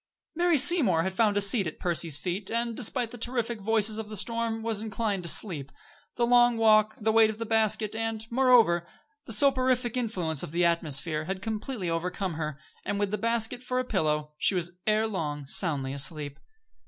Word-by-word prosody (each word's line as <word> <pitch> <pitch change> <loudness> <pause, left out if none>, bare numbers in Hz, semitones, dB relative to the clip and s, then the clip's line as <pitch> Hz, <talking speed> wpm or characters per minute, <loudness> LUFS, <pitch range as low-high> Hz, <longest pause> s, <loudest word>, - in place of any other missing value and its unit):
Mary 345 -1 +2
Seymour 250 - +4
had 190 +2 -3
found 205 0 +2
a 205 - +3
seat 200 -1 +3
at 155 - -7
Percy's 170 -4 0
feet, 185 +4 -4
and, 235 0 -2
despite 245 0 -1
the 245 - -10
terrific 235 -2 -2
voices 220 +1 +2
of 215 -1 -6
the 215 - -5
storm, 225 +2 -1
was 220 -2 -2
inclined 210 -2 -2
to 170 - -5
sleep. 150 -11 -2 0.4
The 240 - +1
long 240 0 +4
walk, 215 -1 +4
the 220 0 +1
weight 220 0 +5
of 215 - -5
the 230 - -4
basket, 220 -1 +1
and, 225 -1 -3
moreover, 235 -9 +4 0.4
the - - -5
soporific 255 -4 +2
influence 185 - -2
of 145 - -6
the 175 +1 +2
atmosphere, 155 -2 0
had 190 +2 -5
completely 220 -2 -4
overcome 180 +2 -3
her, 155 -2 -4 0.3
and, 200 - -3
with 205 -1 -1
the 210 - -2
basket 230 +2 -1
for 255 0 -3
a 255 - 0
pillow, 150 -8 -1
she 195 - +2
was 175 -1 -2 0.2
ere 215 +1 +2
long 150 -9 -4
soundly 135 -3 +1
asleep. 145 0 -1
215 Hz, 190 wpm, -27 LUFS, 170-230 Hz, 0.4 s, weight